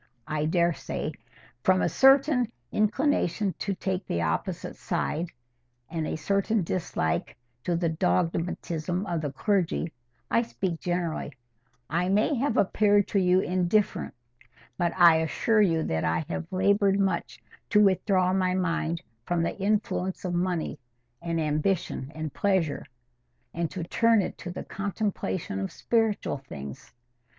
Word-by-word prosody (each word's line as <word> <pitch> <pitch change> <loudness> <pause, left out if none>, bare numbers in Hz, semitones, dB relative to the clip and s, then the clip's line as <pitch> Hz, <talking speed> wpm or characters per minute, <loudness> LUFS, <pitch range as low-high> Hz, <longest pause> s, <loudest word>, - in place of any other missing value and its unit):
I 150 0 -1
daresay, 170 +1 0 0.5
from 185 +4 +3
a - - +3
certain 270 -3 +4 0.2
inclination 215 - +1
to 200 -2 -2
take 190 0 -2
the 85 0 -1
opposite 80 0 -2
side, 165 +3 -2 0.6
and 160 -2 -2
a - - -2
certain 200 +4 +1
dislike 160 - -2 0.3
to 175 - +1
the 170 0 +1
dogmatism 165 - -1
of 170 -4 -2
the 145 -3 -3
clergy—I 140 - -1
speak 190 -7 -3
generally—I 145 -2 -4
may 210 +8 +3
have 270 -2 0
appeared 205 0 +3
to 200 - +2
you 185 0 +4
indifferent, 185 +3 0 0.6
but 170 +5 +1
I 170 -3 +8
assure 215 +7 +2
you 165 -5 +3
that 80 0 -1
I 80 0 0
have 80 -1 -4
laboured 200 +1 +3
much 190 -3 -1 0.3
to 210 - +4
withdraw 185 -1 +3
my 185 -1 +1
mind 170 -2 -1 0.2
from 175 -1 +1
the - - -1
influence 195 -2 -1
of 180 - -1
money, 175 -4 -1 0.4
and 170 -1 -1
ambition, 155 -2 -1
and 155 -2 -4
pleasure, 190 -7 0 0.7
and 170 -1 -1
to 185 -3 -5
turn 225 +4 +3
it - - -5
to 180 - -6
the 175 - -5
contemplation 195 - -3
of 95 - -3
spiritual 225 - 0
things. 70 - -9
180 Hz, 135 wpm, -27 LUFS, 160-200 Hz, 0.7 s, I